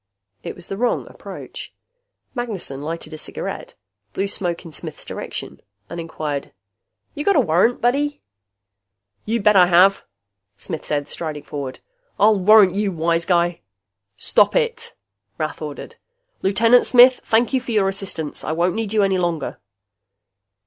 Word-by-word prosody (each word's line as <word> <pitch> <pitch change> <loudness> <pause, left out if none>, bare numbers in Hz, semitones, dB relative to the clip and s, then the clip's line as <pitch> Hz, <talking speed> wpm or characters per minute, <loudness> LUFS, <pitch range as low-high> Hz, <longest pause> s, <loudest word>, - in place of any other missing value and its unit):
It - - -6
was 180 - -11
the 195 - -5
wrong 245 +2 0
approach. - - -10 0.6
Magnessen 205 - -5
lighted 160 +1 -6
a 155 - -7
cigarette, - - -6 0.4
blew 195 - -1
smoke 175 -3 -3
in 165 - -9
Smith's - - -8
direction 70 +1 -6 0.3
and 170 - -5
inquired, 155 -4 -5 0.6
"You 295 - -4
got 400 - +3
a - - +5
warrant, 215 +2 +2
buddy?" 285 +4 0 1.0
"You 225 -1 -1
bet 210 0 +5
I 180 -2 +7
have," 180 +3 +5 0.5
Smith 160 - -6
said, 145 -1 -2
striding 155 -3 -5
forward. 140 -3 -6 0.4
"I'll 210 0 +5
warrant 200 -1 +6
you, 200 0 0
wise 165 0 0
guy." 175 -2 +1 0.6
"Stop - - +3
it!" - - -1 0.4
Rath 155 0 -4
ordered. 150 -2 -7 0.4
"Lieutenant 230 +5 +4
Smith, 250 +1 +7
thank 235 +3 +2
you 260 - +2
for 250 - -10
your 210 -3 +2
assistance. 190 -6 -3
I 155 - -2
won't 175 +2 +1
need 220 -2 -3
you 210 -2 +3
any 190 -1 +2
longer." 175 -3 -2
185 Hz, 150 wpm, -21 LUFS, 165-220 Hz, 1.0 s, I